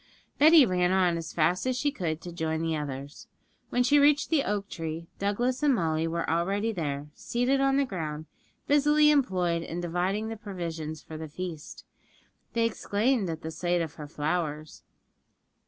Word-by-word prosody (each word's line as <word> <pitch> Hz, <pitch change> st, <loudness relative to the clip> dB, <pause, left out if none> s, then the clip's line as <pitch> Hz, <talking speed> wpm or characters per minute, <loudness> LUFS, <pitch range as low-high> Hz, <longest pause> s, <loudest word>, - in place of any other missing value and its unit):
Betty 310 Hz, -1 st, +8 dB
ran 180 Hz, -3 st, +1 dB
on 185 Hz, -2 st, +3 dB
as 165 Hz, -1 st, -5 dB
fast 175 Hz, +7 st, +1 dB
as 255 Hz, -1 st, 0 dB
she 290 Hz, +2 st, +1 dB
could 165 Hz, -, -3 dB
to 175 Hz, -, -7 dB
join 160 Hz, -1 st, -2 dB
the 165 Hz, -1 st, 0 dB
others. 140 Hz, -1 st, -6 dB, 0.4 s
When 245 Hz, -, +2 dB
she 290 Hz, +4 st, +5 dB
reached 290 Hz, +2 st, +4 dB
the 305 Hz, -4 st, +3 dB
oak 205 Hz, -1 st, -2 dB
tree, 165 Hz, -2 st, -5 dB
Douglas 240 Hz, +6 st, 0 dB
and 290 Hz, -3 st, +4 dB
Molly 160 Hz, -3 st, 0 dB
were 165 Hz, 0 st, -2 dB
already 195 Hz, +7 st, 0 dB
there, 150 Hz, -6 st, -4 dB
seated 250 Hz, -, 0 dB
on 275 Hz, 0 st, +3 dB
the 280 Hz, -, +3 dB
ground, 155 Hz, -, -5 dB, 0.4 s
busily 295 Hz, +1 st, +4 dB
employed 180 Hz, -, +1 dB
in 170 Hz, +1 st, -5 dB
dividing 180 Hz, +5 st, -1 dB
the 225 Hz, -, -5 dB
provisions 165 Hz, -6 st, -6 dB
for 160 Hz, -, -8 dB
the 160 Hz, 0 st, -7 dB
feast. 165 Hz, -1 st, -7 dB, 0.7 s
They 230 Hz, -1 st, +2 dB
exclaimed 220 Hz, -1 st, 0 dB
at 160 Hz, -, -5 dB
the 160 Hz, -, -4 dB
sight 175 Hz, +1 st, 0 dB
of 155 Hz, -3 st, -6 dB
her 150 Hz, -2 st, -8 dB
flowers. 155 Hz, 0 st, -3 dB
180 Hz, 170 wpm, -28 LUFS, 160-240 Hz, 0.7 s, Betty